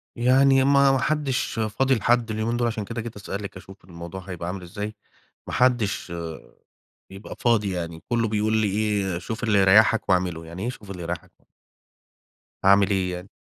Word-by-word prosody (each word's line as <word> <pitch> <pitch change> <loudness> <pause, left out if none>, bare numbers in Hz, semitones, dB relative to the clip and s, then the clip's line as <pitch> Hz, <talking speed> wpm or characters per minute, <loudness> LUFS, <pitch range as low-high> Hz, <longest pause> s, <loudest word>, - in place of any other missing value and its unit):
يعني 130 +2 +4
ما 140 0 +5
ما 135 - +2
حدش 135 -4 -1
فاضي 125 +5 +1
لحد 115 +1 +1
اليومين 110 +2 -1
دول، 120 -1 +1
عشان 110 -3 -3
كده 115 +1 -5
جيت 115 -1 -8
أسألِك 100 -1 -6
أشوف 95 -1 -14
الموضوع 85 +1 -8
هيبقى 90 -2 -7
عامل 90 +1 -4
إزاي. 105 +4 -6 0.5
ما - - -6
حدش، 120 -8 +1 1.0
بيبقى 95 +2 -9
فاضي 110 -5 +2
يعني. 85 -2 -5
كله 115 -2 +1
بيقول 110 +1 +1
لي 110 -2 +2
إيه؟ 100 -3 0
شوف 110 +6 -5
اللي 105 -3 +3
يريحك 105 +4 +5
واعمله. 90 -3 0
يعني 85 +4 -8
إيه 120 - -1
شوف 105 -6 -12
اللي 90 -3 -6
يريحك؟ 85 0 -7 1.2
أعمل 100 -1 +5
إيه 95 -2 0
يعني؟ 90 +2 -7
105 Hz, 170 wpm, -24 LUFS, 95-120 Hz, 1.2 s, ما